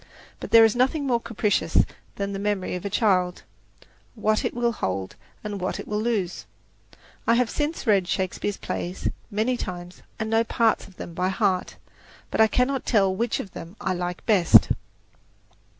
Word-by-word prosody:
But - - -7
"there 225 0 +8
is 225 - +2
nothing 265 +4 +1
more 245 -3 +2
capricious 210 -8 0 0.4
than 200 0 -3
the 195 - -4
memory 200 -2 -1
of 180 - -4
a 200 - -2
child: 185 -4 +1 0.7
what 215 -1 +1
it - - -2
will 240 0 +1
hold, 95 - -3 0.3
and 205 -2 -5
what 185 - -2
it - - -7
will 210 0 -1
lose." 210 -6 -2 0.8
I 230 - +5
have 245 -1 +1
since 300 +1 -2
read 200 -5 +3
Shakespeare's 190 +2 -2
plays 180 +2 -3 0.2
many 220 +5 0
times 180 -3 -7 0.2
and 220 - -3
know 225 0 +4
parts 230 -1 +1
of 190 - -19
them 170 - -7
by 180 +2 0
heart, 190 -2 0 0.6
but - - +2
I 220 - +7
cannot 255 +3 +1
tell 195 -5 +2
which 235 +3 -1
of 195 - -6
them 170 +3 -9
I 185 - -1
like 180 0 -4
best. 195 -7 +6
205 Hz, 175 wpm, -25 LUFS, 185-230 Hz, 0.8 s, there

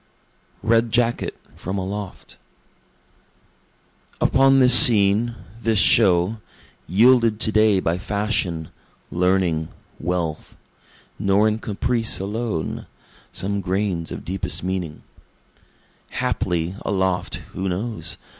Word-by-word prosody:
Red 115 +1 +2
Jacket 120 0 0 0.2
(From 95 +3 -5
Aloft) 100 +1 -7 1.8
Upon 135 0 +4
this 125 -2 +7
scene, 115 -3 +6 0.3
this 115 -1 0
show, 100 0 +3 0.5
Yielded 115 +3 +3
to 110 - +1
day 110 -2 +3
by 85 0 -2
fashion, 100 -5 -2 0.4
learning, 90 -3 0 0.3
wealth, 85 -2 -4 0.6
(Nor 100 +2 +2
in 110 +1 -1
caprice 115 +2 -1
alone 105 -3 -4 0.4
some 100 +1 -3
grains 95 -2 -2
of - - -8
deepest 95 -1 -3
meaning,) 90 -5 -4 1.1
Haply, 85 0 -2
aloft, 95 -2 -1 0.2
(who 95 +1 -3
knows?) 105 +5 -4
100 Hz, 95 wpm, -21 LUFS, 90-115 Hz, 1.8 s, this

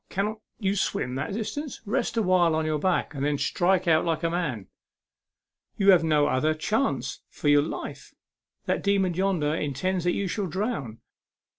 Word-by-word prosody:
Cannot 210 +3 -2 0.2
you 200 -2 0
swim 125 -9 -1
that 140 +9 -3
distance? 275 +6 -4
Rest 210 +2 -1
awhile 185 -6 +3
on 160 0 0
your 155 -1 0
back, 180 +1 0
and 140 -1 -4
then 145 0 +1
strike 180 +4 +1
out 160 -1 +4
like 165 0 -1
a 165 - +1
man. 150 - -2 1.1
You 195 0 +6
have 180 -3 +5
no 150 -2 +3
other 155 +3 +1
chance 155 - -1
for 145 - -2
your 145 0 +6
life. 150 - -6 0.5
That - - 0
demon 195 -3 +2
yonder 175 -5 0
intends 165 +5 -1
that 175 - +2
you 200 - -1
shall 195 +2 -2
drown. 170 - -3
175 Hz, 170 wpm, -26 LUFS, 150-195 Hz, 1.1 s, You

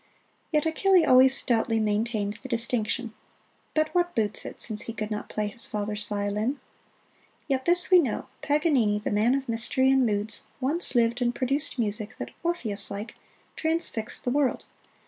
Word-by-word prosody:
Yet 300 -1 +1
Achille 360 +2 +3
always 260 +1 +6
stoutly 225 -2 +1
maintained 210 -1 -1
the 265 - -9
distinction 235 0 -2 0.6
but 310 0 +1
what 350 -1 +1
boots 210 -2 0
it, - - -9
since 215 -2 -3
he 230 - -6
could 215 -1 -5
not 210 - -4
play 215 - -2
his 210 +3 +3
father's 210 0 -4
violin? 210 +6 -2 0.9
Yet 265 -2 -1
this 350 +2 +5
we 365 - +8
know 265 -10 -1 0.2
Paganini, 285 -9 +2
the 210 - -3
man 215 +5 +2
of 275 -1 -3
mystery 235 +3 +1
and 265 -1 +4
moods, 210 -2 -1
once 280 +4 0
lived 235 +1 +2
and 240 0 0
produced 275 +3 -1
music 215 0 -2
that, - - -6
Orpheus 230 - -2
like, 205 +2 -6 0.4
transfixed 320 -9 -2
the 245 - -1
world. 280 -1 0
240 Hz, 165 wpm, -26 LUFS, 215-280 Hz, 0.9 s, we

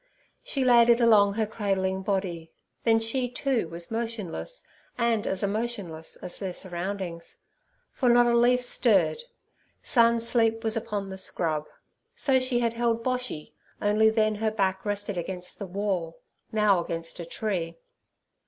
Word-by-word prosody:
She 270 -2 -1
laid 240 -1 +6
it 235 0 +6
along 210 -4 +5
her 220 +1 0
cradling 190 -3 -1
body, 185 -5 -2 0.3
then 225 -1 +5
she, 245 +3 -1
too, 250 - 0
was 170 +3 -9
motionless 225 - -4 0.3
and 235 -3 +1
as 190 - 0
emotionless 200 -6 -3
as 175 - -9
their 190 -3 -4
surroundings, 175 -1 -5 0.5
for 255 - +1
not 240 0 +6
a 240 0 +3
leaf 250 +1 +4
stirred: 470 - +2 0.6
sun 235 -1 +4
sleep 225 -1 +1
was 220 0 0
upon 210 -4 -3
the 190 - -6
scrub. 155 -5 -1 0.5
So 265 -2 +3
she 255 -1 0
had 230 -1 +1
held 230 -1 0
Boshy, 250 -11 -3 0.3
only 215 +1 +4
then 215 -1 +2
her 220 - +2
back 190 -3 -1
rested 205 -2 -2
against 180 +1 -6
the 200 - -5
wall, 185 -3 -2 0.3
now 210 -5 +3
against 165 0 -6
a 170 - -5
tree. 170 -4 -3
210 Hz, 150 wpm, -27 LUFS, 190-235 Hz, 0.6 s, laid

